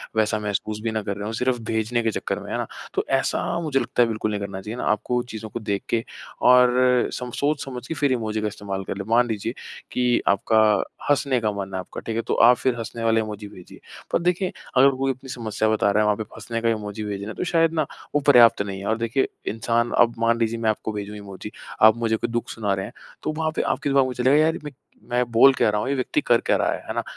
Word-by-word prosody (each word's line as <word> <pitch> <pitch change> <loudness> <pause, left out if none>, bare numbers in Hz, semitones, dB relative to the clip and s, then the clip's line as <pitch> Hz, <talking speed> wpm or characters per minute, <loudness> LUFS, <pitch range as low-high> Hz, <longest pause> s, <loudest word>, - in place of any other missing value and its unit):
वैसा 110 0 +1
महसूस 105 +1 -3
भी 115 - -1
ना 110 -1 -1
कर 100 0 -3
रहे 105 - -5
हों, 110 - -3
सिर्फ़ 125 +1 0
भेजने 115 +2 0
के 115 - +1
चक्कर - - -3
में, - - -9
है - - -1
ना? - - -3 0.3
तो - - -1
ऐसा 135 +5 0
मुझे 145 -4 0
लगता 120 0 0
है - - +1
बिल्कुल 110 -1 -2
नहीं 105 - -2
करना 95 -1 -5
चाहिए 110 +5 -6
ना, - - -4
आपको 120 +4 0
चीज़ों 110 0 -6
को 120 - -5
देख 100 -2 -2
के 115 -1 +1 0.5
और 125 0 +5
सम 125 -1 -5
सोच 145 0 0
समझ 125 -2 -7
के - - -3
फिर 145 -3 +1
इमोजी 110 -3 -1
का 105 - 0
इस्तेमाल 100 -2 -5
कर 95 - -5
लें। 100 - -5
मान 120 +1 +4
लीजिए 110 +1 -3 0.4
कि 125 -1 +2
आपका 110 +2 +3 0.5
हँसने 140 -3 +2
का 105 -1 +1
मन 100 -1 -5
है 95 - -2
आपका, 90 - -8
ठीक 115 - -4
है? 115 - 0
तो - - -2
आप 120 +1 +6
फ़िर 130 -2 0
हँसने 115 +1 -6
वाले 115 0 +3
इमोजी 105 -1 -6
भेजिए। 90 -3 -14 0.3
पर - - +2
देखें, 180 +2 0 0.3
अगर 135 +2 +7
कोई 135 0 +1
अपनी 130 +1 -10
समस्या 110 -3 -1
बता 105 -2 +2
रहा 105 - +2
है, - - +1
वहाँ 105 -1 +3
पे 110 - -3
आप 105 - -21
हँसने 115 +2 -4
का 115 - +2
इमोजी 105 -1 -3
भेज 105 -1 -3
रहे 100 - -6
हैं 110 - -6
तो - - -3
शायद 165 -2 +2
ना 155 -3 +1 0.3
वो 145 - +3
पर्याप्त 120 -5 +7
नहीं 100 -1 -4
है। 100 - -7
और 110 - +1
देखिए 115 +4 0 0.2
इंसान 115 +1 0
अब 120 -1 +5
मान 115 0 +2
लीजिए 115 0 0
मैं 110 -1 +1
आपको 110 0 -2
भेजूँ 105 0 -5
इमोजी, 100 +1 -9 0.3
आप 110 +1 +8
मुझे 115 -1 +1
कोई - - -3
दुख 120 0 -2
सुना 105 -3 -1
रहे 95 0 -3
हैं, - - -10 0.3
तो 155 - -1
वहाँ 160 -1 0
पे - - +1
आपके 145 - -1
दिमाग 135 -1 +4
में 125 - -4
चलेगा, 130 +3 +3
"यार, 160 +1 +4
ये - - -6
मैं 150 - -6 0.4
मैं 125 +1 +2
बोल 135 +4 +7
क्या 110 - +2
रहा 105 0 0
हूँ, 130 - -2
ये 140 - +1
व्यक्ति 135 - 0
कर - - +4
क्या - - +3
रहा - - +1
है?" - - -5
है - - -3
ना? - - -1
115 Hz, 270 wpm, -23 LUFS, 105-125 Hz, 0.5 s, आप